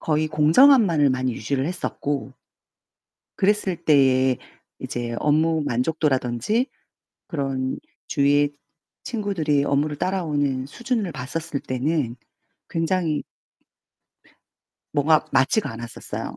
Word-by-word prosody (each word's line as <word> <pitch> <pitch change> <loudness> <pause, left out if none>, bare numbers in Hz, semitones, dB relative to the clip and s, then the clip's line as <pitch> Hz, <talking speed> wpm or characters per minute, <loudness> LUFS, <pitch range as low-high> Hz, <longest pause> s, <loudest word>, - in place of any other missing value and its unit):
거의 155 0 0
공정함만을 160 - +5
많이 130 -1 0
유지를 135 +5 -2
했었고 145 -6 -3 1.1
그랬을 195 -2 +1
때에 130 -4 +3 0.4
이제 120 -1 -4
업무 155 +1 +2
만족도라던지 130 - 0 0.6
그런 135 -3 -2 0.3
주위에 145 0 +2 0.5
친구들이 180 - 0
업무를 145 +1 0
따라오는 145 -8 -1
수준을 235 - -2
봤었을 150 +3 -4
때는 130 -1 -1 0.5
굉장히 165 -2 0 1.7
뭐가 150 +1 +3
맞지가 135 - +2
않았었어요. 115 +1 -7
150 Hz, 245 characters per minute, -23 LUFS, 130-165 Hz, 1.7 s, 공정함만을